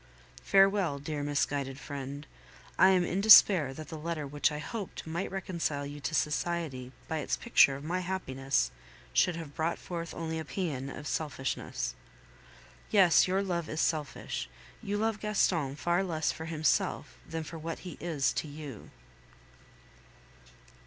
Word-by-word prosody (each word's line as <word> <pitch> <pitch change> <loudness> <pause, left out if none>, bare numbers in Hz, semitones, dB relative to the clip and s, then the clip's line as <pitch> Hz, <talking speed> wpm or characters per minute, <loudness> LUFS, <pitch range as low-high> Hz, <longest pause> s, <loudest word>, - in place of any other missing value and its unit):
Farewell, 195 -6 +4
dear 145 +1 -4
misguided 140 -1 -1
friend. 140 0 -6 0.5
I 190 - +6
am 185 -2 +4
in 185 +3 -1
despair 195 -8 +8
that 155 +1 -8
the 160 - -6
letter 160 -1 -3
which 145 +2 +1
I 150 - -4
hoped 200 +6 -6
might 165 +4 -3
reconcile 170 -6 -2
you 145 +1 -7
to 155 +3 -3
society 150 -4 -1 0.2
by 160 - -2
its - - -1
picture 140 - +5
of 140 - -8
my 175 +4 -1
happiness 135 - -1 0.4
should 180 - +3
have 160 -4 -7
brought 160 +3 -1
forth 170 -2 -6
only 160 -1 -3
a - - -3
paean 150 -8 -3
of 145 +2 -8
selfishness. 135 - -3 1.0
Yes, 190 -5 +6
your 190 +2 +1
love 170 -4 -2
is 155 - -3
selfish; 155 -4 -2 0.3
you 205 -2 -2
love 220 0 0
Gaston 175 -9 +1
far 175 +5 +1
less 160 -4 0
for 160 - -7
himself 155 -2 0
than 165 0 -3
for 165 +1 -8
what 165 +1 -4
he 180 - -8
is 160 -5 0
to - - -3
you. 145 -5 -9
160 Hz, 150 wpm, -30 LUFS, 145-180 Hz, 1.0 s, despair